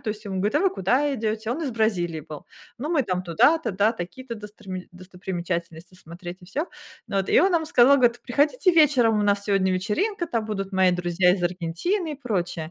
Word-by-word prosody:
то - - -6
есть 215 +1 -5
ему 195 -2 -4
говорит: 205 +7 -1
"А 300 - +3
вы 385 -1 +3
куда 255 +10 +1
идете?" 220 -1 -2
Он 275 +7 -2
из 275 - -2
Бразилии 180 -8 -1
был. 150 0 -10 0.3
Ну, 290 +5 -4
мы 315 -5 +2
там 185 -4 -2
туда-то, 220 - +3
да, 205 +4 +2
такие-то 235 +6 -7
досторми 205 -3 -9
достопримечательности 180 -2 -6
смотреть 175 +1 -10
и - - -13
всё. 290 - -2 0.4
Ну 195 - -3
вот, 190 -1 0
и - - +5
он 380 +1 +3
нам 320 -2 +1
сказал, 280 -3 +5
говорит: 240 -2 +2
"Приходите 305 - +2
вечером, 265 -9 +4
у - - +1
нас 200 0 +1
сегодня 195 -2 +1
вечеринка, 335 - -1
там 230 -6 -2
будут 195 -2 -4
мои 190 -1 +3
друзья 180 0 +2
из 180 - -5
Аргентины 180 - -2
и - - -5
прочее". 175 -7 -3
205 Hz, 210 wpm, -24 LUFS, 180-260 Hz, 0.4 s, и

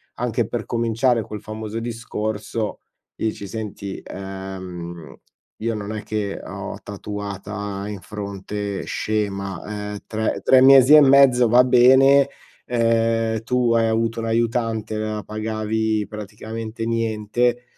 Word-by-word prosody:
anche - - -1
per - - -4
cominciare 115 +1 +1
quel 105 +1 -7
famoso 110 +1 -5
discorso 110 -2 -4 0.4
dici: 105 -2 -3
"Senti, 100 -2 -6
ehm, 95 -3 -7 0.4
io 115 +1 -2
non 105 0 -5
è 105 - -5
che 105 -2 -3
ho - - -6
tatuata 100 0 -5
in 105 -2 -6
fronte 100 0 -5
scema, 105 0 -3
ehm, - - -5
tre 110 0 -2
tre 130 - +6
mesi 135 +1 +8
e 155 - +11
mezzo 135 -3 +6
va 120 +3 +6
bene, 130 +3 +6 0.4
ehm, 115 -1 +1
tu 125 0 +1
hai 115 -1 +3
avuto 115 +1 0
un 115 - -3
aiutante, 115 -1 -1
la 110 -1 -3
pagavi 110 0 -1
praticamente 110 +2 -6
niente, 115 +2 0
110 Hz, 120 wpm, -22 LUFS, 105-115 Hz, 0.4 s, e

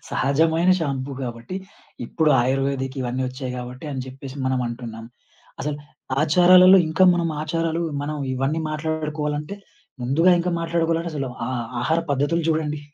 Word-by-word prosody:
సహజమైన 160 +5 +2
షాంపూ 140 -3 -2
గాబట్టి. 120 +7 -5 0.5
ఇప్పుడు 160 -2 +1
ఆయుర్వేదికివన్నీ 130 0 -1
ఒచ్చాయి 130 0 -6
గాబట్టి. 125 +3 -7
అని 135 -2 -3
జేప్పేసి 135 +1 -9
మనం 130 -1 0
అంటున్నాం. 115 -1 -7 0.6
అసలు 150 0 -2 0.5
ఆచారాలలో 180 +4 +7
ఇంకా, 165 +4 +3
మనం 170 -1 0
ఆచారాలు 165 +1 -1 0.2
మనం 150 +1 -3 0.2
ఇవన్నీ 135 +5 -1
మాట్లాడుకోవాలంటే, 155 0 -3 0.5
ముందుగా 150 +9 +3
ఇంకా 175 +1 -1
మాట్లాడుకోవాలంటే 165 0 0
అసలు 140 -3 -2 0.2
ఆహ్, 125 -2 -2 0.2
ఆహార 160 +6 +1
పద్ధతులు 145 +5 +1
చూడండి. 150 -2 -1
150 Hz, 125 wpm, -23 LUFS, 130-165 Hz, 0.6 s, ఆచారాలలో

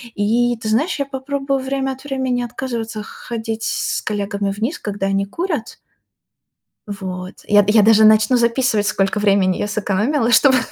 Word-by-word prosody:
И, 235 +4 +1
ты 225 - -7
знаешь, 270 +12 +1
я 280 - -1
попробую 275 0 -3
время 270 0 -2
от 265 0 -9
времени 260 -3 -2
отказываться 230 -3 -5
х - - -13
ходить 225 -1 -4
с - - -1
коллегами 200 -1 -2
вниз, 220 - -3
когда 200 -2 -3
они 195 0 0
курят. 310 - -4 1.1
Вот, 185 -2 -6
я 205 -1 +5
я 215 +1 +5
даже 220 +1 +5
начну 215 +3 +5
записывать, 235 -3 +1
сколько 195 +1 0
времени 195 -3 +2
я - - -2
сэкономила, 215 +5 0
чтобы 260 +2 +5
225 Hz, 155 wpm, -19 LUFS, 205-260 Hz, 1.1 s, я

